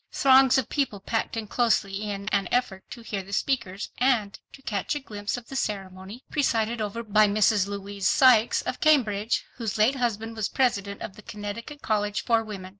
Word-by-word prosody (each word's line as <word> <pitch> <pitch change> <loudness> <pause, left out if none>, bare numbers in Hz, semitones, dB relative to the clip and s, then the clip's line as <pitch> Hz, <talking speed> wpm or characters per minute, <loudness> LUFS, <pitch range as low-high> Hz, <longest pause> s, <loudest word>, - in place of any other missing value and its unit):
Throngs 265 0 +5
of 265 - 0
people 270 -8 -1
packed 225 +3 -2
in 225 - -3
closely 210 -2 0
in 200 -1 -5
an 200 -3 0
effort 230 -6 0
to 235 - -9
hear 205 -3 -4
the 190 +1 -13
speakers, 200 -5 -2
and 240 -6 +1
to 270 - -15
catch 205 +5 -2
a - - -2
glimpse 210 -4 -5
of 240 - -10
the 270 - -8
ceremony, 195 0 -4
presided 230 -5 0
over 215 +2 -3
by 215 -1 +4
Mrs. 205 -1 +2
Louise 200 -1 -3
Sykes 245 -4 +5
of - - -4
Cambridge, 230 -8 +2
whose 225 -3 -3
late 230 +6 +3
husband 225 -2 -2
was 220 -2 -2
President 200 -6 -1
of 195 - -8
the - - -11
Connecticut 215 +9 -7
College 210 -1 -1
for 230 -2 +2
Women. 195 -4 -8
215 Hz, 190 wpm, -26 LUFS, 200-245 Hz, -, Throngs